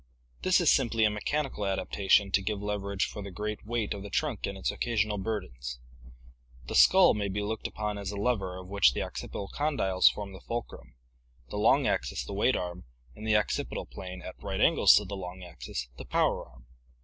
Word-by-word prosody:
This 185 Hz, 0 st, +4 dB
is 175 Hz, -, +5 dB
simply 115 Hz, -4 st, +2 dB
a 105 Hz, -, +3 dB
mechanical 135 Hz, +2 st, -2 dB
adaptation 100 Hz, 0 st, +2 dB
to 100 Hz, -, +3 dB
give 100 Hz, +1 st, -2 dB
leverage 100 Hz, -1 st, -1 dB
for 105 Hz, -, -7 dB
the 100 Hz, -, -6 dB
great 105 Hz, +3 st, -4 dB
weight 115 Hz, -2 st, -1 dB
of 100 Hz, -, -7 dB
the 100 Hz, -, -7 dB
trunk 135 Hz, -1 st, -1 dB
and 100 Hz, -, -5 dB
its 95 Hz, -, -1 dB
occasional 110 Hz, -3 st, 0 dB
bur 110 Hz, +1 st, -1 dB
dens. 60 Hz, -4 st, -8 dB, 0.9 s
The -, -, -6 dB
skull 190 Hz, -1 st, +7 dB
may 105 Hz, -1 st, -1 dB
be 100 Hz, +1 st, -2 dB
looked 110 Hz, +1 st, -3 dB
upon 105 Hz, -1 st, -4 dB
as 100 Hz, -2 st, -4 dB
a 105 Hz, -, -4 dB
lever 100 Hz, -4 st, -1 dB
of 95 Hz, 0 st, -9 dB
which 100 Hz, -10 st, +4 dB
the -, -, -2 dB
oc -, -, -7 dB
cipital 100 Hz, -, -5 dB
condyles 135 Hz, -11 st, +3 dB
form 100 Hz, -2 st, -7 dB
the 95 Hz, -, -11 dB
fulcrum, 115 Hz, -, -6 dB, 0.5 s
the -, -, -5 dB
long 130 Hz, +6 st, +4 dB
axis 65 Hz, -, -1 dB
the -, -, -6 dB
weight -, -, +2 dB
arm, 90 Hz, 0 st, -4 dB, 0.3 s
and 110 Hz, -, -7 dB
the 110 Hz, -, +3 dB
occipital 105 Hz, -, -2 dB
plane, 90 Hz, -1 st, -8 dB
at -, -, -9 dB
right -, -, -3 dB
angles -, -, +6 dB
to -, -, +2 dB
the 100 Hz, -, -5 dB
long 90 Hz, -1 st, -7 dB
axis, 65 Hz, -7 st, -6 dB
the -, -, -7 dB
power -, -, 0 dB
arm. 60 Hz, -1 st, -19 dB
100 Hz, 210 wpm, -29 LUFS, 95-110 Hz, 0.9 s, skull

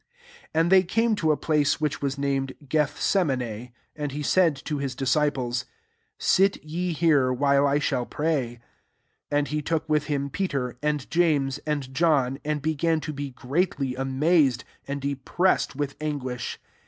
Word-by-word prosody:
82 -, -, -28 dB
Ann 165 Hz, +1 st, +3 dB
they 190 Hz, 0 st, +7 dB
came^to 215 Hz, -4 st, +1 dB
a 150 Hz, -, +1 dB
place 150 Hz, -2 st, +1 dB
which 150 Hz, -2 st, -1 dB
was 140 Hz, -1 st, -1 dB
named 135 Hz, -1 st, -1 dB
Gethseman6; 130 Hz, -, 0 dB, 0.2 s
and 150 Hz, -2 st, -3 dB
he 145 Hz, +1 st, -4 dB, 0.2 s
and 165 Hz, -5 st, +3 dB
to 150 Hz, -, -2 dB
Ms 135 Hz, -2 st, -3 dB
disciples, 135 Hz, -2 st, 0 dB, 0.5 s
•Sit 195 Hz, +1 st, +3 dB
ye 175 Hz, +4 st, -2 dB
here, 150 Hz, -6 st, +3 dB
while 140 Hz, +2 st, +3 dB
I 140 Hz, +1 st, +2 dB
shall 130 Hz, -4 st, -1 dB
pray." 140 Hz, -6 st, -1 dB, 0.7 s
33 145 Hz, -, +1 dB
And 145 Hz, 0 st, +1 dB
he 150 Hz, 0 st, -1 dB
took 160 Hz, +1 st, -1 dB
with 150 Hz, -1 st, +1 dB
hhn 140 Hz, -1 st, -2 dB
Peterf 140 Hz, -11 st, -2 dB
and 150 Hz, -2 st, -1 dB
James, 145 Hz, -5 st, +2 dB
and 140 Hz, -3 st, -2 dB
John, 135 Hz, -4 st, +2 dB
and 150 Hz, -1 st, -2 dB
began 160 Hz, +1 st, +1 dB
to 155 Hz, -, -5 dB
be 140 Hz, -1 st, -5 dB
gready 135 Hz, 0 st, -1 dB
amazed, 135 Hz, 0 st, +2 dB, 0.2 s
and 140 Hz, +1 st, -3 dB
depressed 140 Hz, +7 st, 0 dB
with 140 Hz, 0 st, -3 dB
anguish. 130 Hz, -5 st, -3 dB
145 Hz, 155 wpm, -25 LUFS, 135-155 Hz, 0.7 s, they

